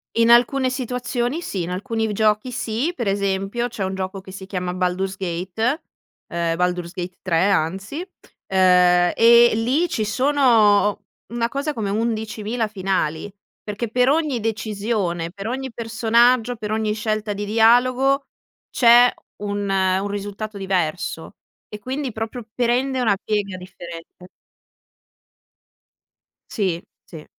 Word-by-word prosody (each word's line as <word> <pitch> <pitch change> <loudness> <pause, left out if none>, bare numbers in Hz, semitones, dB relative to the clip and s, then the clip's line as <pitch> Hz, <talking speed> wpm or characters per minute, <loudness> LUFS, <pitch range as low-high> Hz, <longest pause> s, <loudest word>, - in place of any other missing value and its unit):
In 230 0 +3
alcune 255 +2 +4
situazioni 250 +2 -2
sì, 195 - -3
in 175 - -5
alcuni 220 +2 -2
giochi 215 +3 +1
sì 240 +8 -2
per 235 -5 -3
esempio 200 +4 -1
c'è 230 -5 -5
un 190 0 -2
gioco 190 +1 -4
che 190 - -12
si 190 0 -8
chiama 180 -2 -3
Baldur's 185 +1 -1
Gate, 190 - -2 0.5
ehm, 170 -1 -1
Baldur's 180 0 -1
Gate 180 0 -6
3 185 +2 +2
anzi, 195 - -1 0.4
ehm, 180 -2 +4
e 235 +1 +7
lì 260 +10 +1
ci 225 -10 -1
sono 220 -5 +3 0.3
una 235 0 0
cosa 285 +3 -2
come 215 -5 -3
11000 220 +1 -2
finali, 190 -3 -2 0.3
perché 210 +2 -4
per 250 +3 +2
ogni 295 -4 +1
decisione, 210 -6 -2
per 200 +2 -7
ogni 260 0 -4
personaggio, 235 +1 +2
per 210 -1 -5
ogni 215 -1 0
scelta 215 -1 -2
di 205 +1 -4
dialogo 250 +5 +3 0.4
c'è 240 0 +6 0.3
un, 205 0 -3
un 190 0 +1
risultato 205 +1 -5
diverso 180 -2 -2 0.3
e 210 - -9
quindi 260 +3 -4
proprio 225 +1 -5
prende 250 +2 0
una 215 -5 +2
piega 200 -2 -2
differente. 175 -1 -11 2.2
Sì, 185 -6 -1 0.2
sì. 160 -3 -11
215 Hz, 130 wpm, -21 LUFS, 190-240 Hz, 2.2 s, e